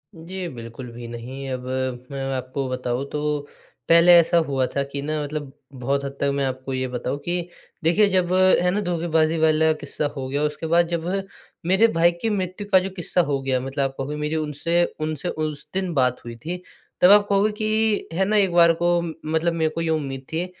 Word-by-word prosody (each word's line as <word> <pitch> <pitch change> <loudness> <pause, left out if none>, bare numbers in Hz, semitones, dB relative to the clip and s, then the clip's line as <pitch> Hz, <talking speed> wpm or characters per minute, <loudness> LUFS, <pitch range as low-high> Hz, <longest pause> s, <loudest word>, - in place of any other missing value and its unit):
जी, 180 +2 -6
बिल्कुल 115 +2 -8
भी 120 0 -8
नहीं, 130 +4 -7
अब 130 -1 -4 0.5
मैं 135 -1 -4
आपको 130 +1 -3
बताऊँ 125 +1 -2
तो 150 0 -1 0.5
पहले 170 +1 +7
ऐसा 170 +1 +4
हुआ 135 -2 +1
था 140 - +1
कि 140 - -3
ना 155 +1 -2
मतलब 145 -1 -5 0.3
बहुत 140 +2 0
हद 140 - -3
तक 140 - +2
मैं 140 - 0
आपको 130 0 -4
ये 130 0 -1
बताऊँ 125 +2 -3
कि, 175 0 -2 0.3
देखिए 175 +6 +4
जब 185 -1 +1
है 185 -1 +4
ना 210 +3 0
धोखेबाज़ी 165 -3 +1
वाला 160 0 +4
किस्सा 150 0 -2
हो 135 -2 -4
गया। 140 +3 -1
उसके 150 +2 -2
बाद 170 +1 +3
जब 170 -1 -3 0.6
मेरे 190 +6 +5
भाई 170 +1 +5
की 225 - 0
मृत्यु 195 0 -3
का 190 - +7
जो 190 - -3
किस्सा 180 -1 0
हो 135 -1 0
गया 130 -1 0
मतलब 135 +2 -2
आप 135 0 -2
कहोगे 140 +2 -4
मेरी 150 +1 -2
उनसे 155 +3 0 0.2
उनसे 155 +2 -2
उस 155 -2 -4
दिन 185 -2 -1
बात 125 -3 +1
हुई 115 0 -7
थी, 175 +9 -6 0.4
तब 180 +2 +8
आप 205 0 +7
कहोगे 200 +2 +3
कि 215 0 +1
है 190 +3 +1
ना 215 +2 +1
एक 195 -3 +3
बार 170 -1 +6
को 175 0 +3
मतलब 160 0 -2
मेरे 160 -1 +1
को 165 - -1
ये 165 - -1
उम्मीद 135 -4 -2
थी, 165 +2 0
155 Hz, 205 wpm, -23 LUFS, 135-175 Hz, 0.6 s, तब